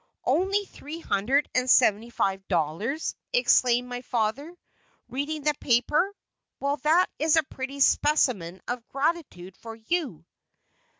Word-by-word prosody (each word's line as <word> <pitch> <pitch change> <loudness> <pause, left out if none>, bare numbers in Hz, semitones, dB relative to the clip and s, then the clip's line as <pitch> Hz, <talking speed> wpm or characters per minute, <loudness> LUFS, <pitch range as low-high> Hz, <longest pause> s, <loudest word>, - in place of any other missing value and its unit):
"Only 395 +3 +1
three 310 -2 -9
hundred 260 +4 +1
and 255 0 +1
seventy 230 -2 +4
five 195 -4 -2
dollars!" 180 - -1 0.2
exclaimed 250 - +3
my 245 0 -5
father, 250 +8 -2 0.5
reading 285 +3 -3
the 300 0 +2
paper; 295 +11 +1 0.4
"well, 280 +1 -1
there 315 +6 +3
is 315 +1 +3
a 320 - +4
pretty 270 0 -7
specimen 235 - +2
of 245 -1 -4
gratitude 275 - -3
for 225 -1 -9
you!" 225 - -3
260 Hz, 125 wpm, -26 LUFS, 225-310 Hz, 0.5 s, seventy